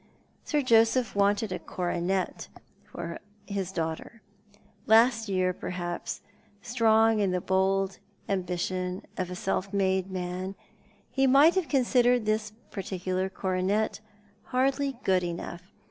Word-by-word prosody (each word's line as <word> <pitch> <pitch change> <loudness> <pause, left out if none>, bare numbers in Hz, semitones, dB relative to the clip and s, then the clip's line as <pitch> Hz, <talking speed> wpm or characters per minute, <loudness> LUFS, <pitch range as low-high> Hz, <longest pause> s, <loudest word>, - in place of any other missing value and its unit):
Sir 300 -2 +1
JosejDh 230 -1 +4
wanted 200 +1 +2
a - - -3
coronet 180 +1 -2 0.4
for 170 -1 -6 0.3
his 195 -3 -3
daughter. 165 +6 -4 0.6
Last 225 0 +5
yeai, 185 -1 +1
perhaps, 175 -1 -4 0.4
strong 225 -1 +3
in 200 -2 +2
the 180 0 0
bold 190 +1 +1 0.3
ambition 185 0 -2
of 185 -1 -3
a 180 - -5
self 195 +1 -2
made 190 -1 +1
man, 185 +1 -4 0.6
he 270 0 +2
might 280 +6 +6
have 375 -4 0
considered 245 -3 +3
this 215 0 0 0.2
particular 185 -1 -2
coronet 190 +4 -1 0.5
hardly 270 +1 0
good 185 -1 +3
enough. 175 +1 -6
195 Hz, 115 wpm, -28 LUFS, 185-225 Hz, 0.6 s, might